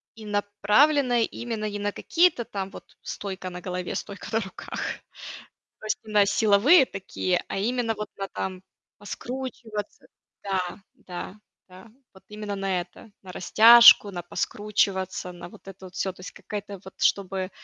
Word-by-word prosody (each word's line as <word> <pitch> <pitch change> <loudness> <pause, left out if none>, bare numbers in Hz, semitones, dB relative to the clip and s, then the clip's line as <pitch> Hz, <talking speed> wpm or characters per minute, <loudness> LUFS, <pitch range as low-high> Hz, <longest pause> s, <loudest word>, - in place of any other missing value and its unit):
и 220 -1 -11
направленная 210 +6 +2
именно 225 -2 -4
не 205 0 -5
на 205 0 -2
какие-то 335 -7 +2
там 195 -1 -5
вот - - -14
стойка 190 -2 -6
на 180 0 -8
голове, 180 0 -4
стойка 200 -2 -6
на 225 - +2
руках, 190 -2 -10 1.1
то - - -9
есть 215 - 0
не 215 - -10
на 205 -1 +5
силовые 225 - +5
такие, 185 -3 -2
а - - -3
именно 230 +2 0
вот 210 -1 -6
на 195 0 -4
там 185 -1 -5 0.4
поскручиваться, 225 -2 -6 0.4
да, 190 -1 -2 0.2
да, 190 -5 -8 0.3
да, 185 +4 -14 0.3
вот 190 - -17
именно 210 -1 -5
на 195 -2 -1
это, 215 +5 -12
на 185 -1 -10
растяжку, 230 +3 +8
на 175 -2 -6
поскручиваться, 190 0 -1
на 175 0 -10
вот - - -15
это 195 0 -11
вот 180 - -14
всё, 190 - -1
то 180 - -17
есть 180 - -8
какая-то 205 -2 -7
вот, 190 - -11
чтобы 190 -1 +1
205 Hz, 160 wpm, -25 LUFS, 190-220 Hz, 1.1 s, растяжку